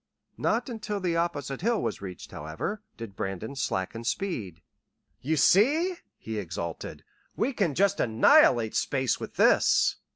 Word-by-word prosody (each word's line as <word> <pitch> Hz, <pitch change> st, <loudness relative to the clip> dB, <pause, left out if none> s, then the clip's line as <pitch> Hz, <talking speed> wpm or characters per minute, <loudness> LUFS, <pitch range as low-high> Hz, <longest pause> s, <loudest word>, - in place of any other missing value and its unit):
Not -, -, 0 dB
until 215 Hz, -4 st, -4 dB
the 180 Hz, -3 st, -1 dB
opposite 150 Hz, -5 st, -2 dB
hill 230 Hz, +3 st, +1 dB
was -, -, -3 dB
reached, 95 Hz, -2 st, -8 dB
however, 80 Hz, -, -5 dB, 0.2 s
did 115 Hz, -4 st, -8 dB
Brandon 95 Hz, +8 st, -4 dB
slacken 115 Hz, -2 st, -3 dB
speed. 115 Hz, -, -3 dB, 0.6 s
"You 155 Hz, +4 st, 0 dB
see," 290 Hz, -, +4 dB, 0.2 s
he 110 Hz, -1 st, -5 dB
exulted, 85 Hz, -3 st, -6 dB, 0.3 s
"we 260 Hz, +5 st, 0 dB
can 180 Hz, -, 0 dB
just 200 Hz, +1 st, +2 dB
annihilate 110 Hz, 0 st, +4 dB
space 130 Hz, -3 st, 0 dB
with -, -, -7 dB
this!" -, -, +4 dB
140 Hz, 135 wpm, -27 LUFS, -, 0.6 s, see